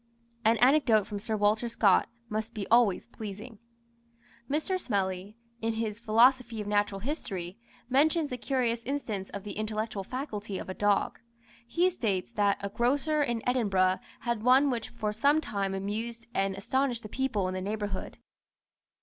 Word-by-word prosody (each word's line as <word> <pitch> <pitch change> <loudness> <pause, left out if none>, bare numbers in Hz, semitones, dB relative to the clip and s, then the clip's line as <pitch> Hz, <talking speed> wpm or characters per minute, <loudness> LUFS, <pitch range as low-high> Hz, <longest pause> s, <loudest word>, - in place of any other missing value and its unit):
An 225 +1 +4
anecdote 245 -4 +4
from 205 -1 -5
Sir 220 +1 -2
Walter 215 +3 +2
Scott 205 -4 +3 0.2
must 220 +1 -4
be 205 -3 -3
always 230 -5 +4
pleasing. 220 0 -8 0.9
Mr. 315 +6 0
Smellie, 195 -2 -2 0.3
in 225 0 0
his 220 -1 -3
"Philosophy 235 +1 +4
of 210 - -3
Natural 205 -1 0
History," 195 - -4 0.3
mentions 295 +4 +2
a 250 - -2
curious 240 -2 0
instance 225 -8 -3
of 200 - -7
the 210 - -6
intellectual 215 -1 -3
faculty 210 -5 -5
of - - -7
a - - -2
dog. 205 +1 +1 0.5
He 345 +8 +2
states 205 - -1
that 205 -3 +2
"a 200 - -3
grocer 280 +8 +1
in 240 -5 -1
Edinburgh 195 -7 +2 0.2
had 235 -2 -1
one 260 +4 +5
which 230 -3 -3
for 215 -3 -3
some 285 +8 +3
time 195 -9 -2
amused 225 +4 -4
and 195 0 0
astonished 250 +3 0
the - - -6
people 220 -5 -1
in 185 - -3
the 185 - -3
neighbourhood. 205 0 -4
220 Hz, 160 wpm, -29 LUFS, 200-250 Hz, 0.9 s, one